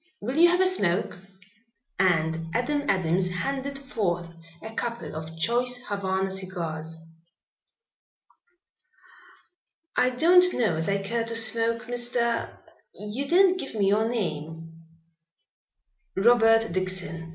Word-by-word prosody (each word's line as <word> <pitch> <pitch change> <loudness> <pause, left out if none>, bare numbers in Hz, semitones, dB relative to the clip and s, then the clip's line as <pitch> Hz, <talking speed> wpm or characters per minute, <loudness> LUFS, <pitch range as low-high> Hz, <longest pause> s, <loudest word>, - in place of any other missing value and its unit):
Will 250 +5 -4
you 340 +2 +6
have 355 +1 +2
a - - +4
smoke?" 190 - +1 0.8
and 165 -3 +1
Adam 285 +4 -1
Adams 180 -1 +1
handed 275 +9 -3
forth 180 -11 -3 0.3
a 220 0 -8
couple 235 -6 -4
of 160 +1 -7
choice 245 +8 +1
Havana 195 -5 -2
cigars. 165 -4 -4 3.0
"I 250 - +3
don't 355 +8 +4
know 220 -9 +1
as 165 +4 -1
I 200 0 0
care 230 +3 -1
to 230 0 -1
smoke, 230 0 +2
Mr. 240 -1 -1 0.5
You 215 +7 -5
didn't 370 +3 +4
give 275 - -6
me 200 -2 +2
your 220 +3 +2
name." 165 -7 -4 1.4
"Robert 225 +1 +4
Dixon. 185 -2 -3
220 Hz, 115 wpm, -26 LUFS, 180-245 Hz, 3.0 s, you